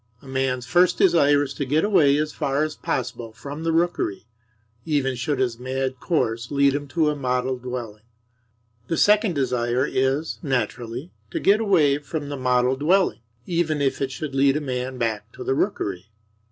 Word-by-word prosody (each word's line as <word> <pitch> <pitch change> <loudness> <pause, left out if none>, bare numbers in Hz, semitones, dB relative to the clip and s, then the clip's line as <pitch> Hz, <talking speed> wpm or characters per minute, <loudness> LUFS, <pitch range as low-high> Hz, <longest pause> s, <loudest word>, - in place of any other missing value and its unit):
A - - -13
man's 130 -1 -1
first 180 +4 +3
desire 145 -6 +4
is 140 -1 -5
to 140 - -3
get 145 +4 +1
away 155 -9 +4
as 150 0 -1
far 140 +2 0
as 155 -1 -3
possible 120 -2 -4
from 145 +6 -8
the 165 - +1
rookery, 165 - 0 0.6
even 140 -3 0
should 130 +4 -2
his 120 -3 -1
mad 130 0 -3
course 120 -8 -1
lead 140 -1 +3
him 145 0 -3
to 155 +1 +1
a - - -3
model 130 -1 -1
dwelling. 120 -4 -6 0.9
The 165 - -1
second 210 -2 +4
desire 125 -1 0
is, 135 +5 -1
naturally, 125 0 -3 0.2
to - - -3
get 205 +2 +4
away 160 -10 +3
from 145 0 -5
the 145 - -3
model 125 0 +2
dwelling, 180 +8 +2 0.3
even 165 -3 0
if 140 -1 0
it 135 -1 -1
should 145 +1 -5
lead 135 +1 +3
a - - 0
man 130 -1 -3
back 110 -2 -2
to - - -8
the - - 0
rookery. 105 - -2
135 Hz, 180 wpm, -23 LUFS, 125-155 Hz, 0.9 s, desire